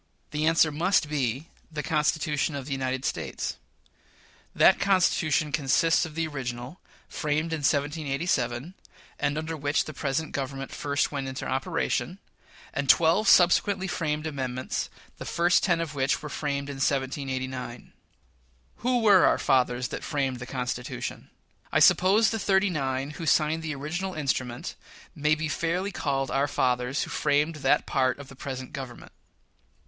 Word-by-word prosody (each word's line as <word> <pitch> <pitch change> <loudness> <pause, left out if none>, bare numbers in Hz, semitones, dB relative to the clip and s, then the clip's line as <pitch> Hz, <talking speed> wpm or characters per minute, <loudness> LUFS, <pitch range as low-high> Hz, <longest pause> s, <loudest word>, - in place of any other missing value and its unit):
The 150 +1 0
answer 165 -1 +4
must 170 +2 +2
be 135 -1 -1 0.3
the 150 -1 -4
Constitution 150 -1 0
of 140 -2 -5
the 140 - -8
United 130 -1 -2
States. - - -3 1.0
That - - +6
Constitution 165 -6 +2
consists 160 +3 +2
of 155 - -12
the 165 0 0
original, 130 0 -5 0.3
framed 155 +2 -1
in 160 - -1
1787 145 -1 -1 0.5
(and 145 +1 0
under 160 +1 -3
which 145 0 0
the 155 - -7
present 145 +3 -2
Government 135 0 -4
first 145 0 -1
went 140 -2 -3
into 130 0 -5
operation), 165 +5 -1 0.6
and 140 -2 -2
twelve 170 +6 +5
subsequently 190 +2 +5
framed 155 -4 -2
amendments, 130 -4 -3 0.3
the - - -5
first 175 +1 +2
ten 175 -4 +2
of 165 -3 -3
which 135 +1 0
were 150 - -5
framed 140 -1 -2
in 140 -1 -6
1789. 130 -2 -2 0.8
Who 245 0 +1
were 200 -4 +6
our - - +3
fathers 125 -1 +1
that - - -5
framed 135 -4 -1
the 125 - -7
Constitution? 125 -2 -4 0.4
I - - +2
suppose 195 +4 +5
the 225 - -2
"thirty 195 -1 +2
nine" 135 -2 -2
who 160 +1 -6
signed 155 +1 +3
the 155 -2 -4
original 175 +7 -4
instrument 130 -5 -2 0.4
may 150 +1 +2
be 155 +1 -3
fairly 170 +6 -1
called 135 -6 -1
our 140 +1 +2
fathers 125 0 0
who - - -7
framed 150 +2 +1
that 145 - +2
part 130 -1 +1
of 140 -1 -11
the 135 - -12
present 130 -1 -6
Government. 135 -3 -8
145 Hz, 150 wpm, -27 LUFS, 135-165 Hz, 1.0 s, That